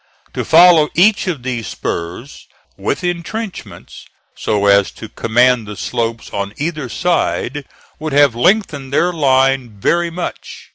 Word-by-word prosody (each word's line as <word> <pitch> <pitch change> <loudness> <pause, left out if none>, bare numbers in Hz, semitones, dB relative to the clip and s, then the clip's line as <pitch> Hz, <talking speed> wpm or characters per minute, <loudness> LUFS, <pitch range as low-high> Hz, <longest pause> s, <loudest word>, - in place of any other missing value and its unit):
To - - -3
follow 165 -2 +6
each 200 +3 +3
of 155 -9 -3
these 125 -3 -4
spurs 85 +11 -6 0.3
with 100 - -3
intrenchments, 175 - -6 0.3
so 105 -1 -1
as 100 -1 +4
to - - -9
command 120 0 +2
the 105 - -7
slopes 115 -1 -3
on 100 +1 -4
either 150 -3 -3
side, 155 -3 -1 0.3
would 155 0 -4
have 145 -3 +5
lengthened 145 - 0
their 175 +5 +1
line 135 -6 +1
very 170 +10 +1
much. 175 +1 -7
135 Hz, 135 wpm, -17 LUFS, 115-170 Hz, 0.3 s, follow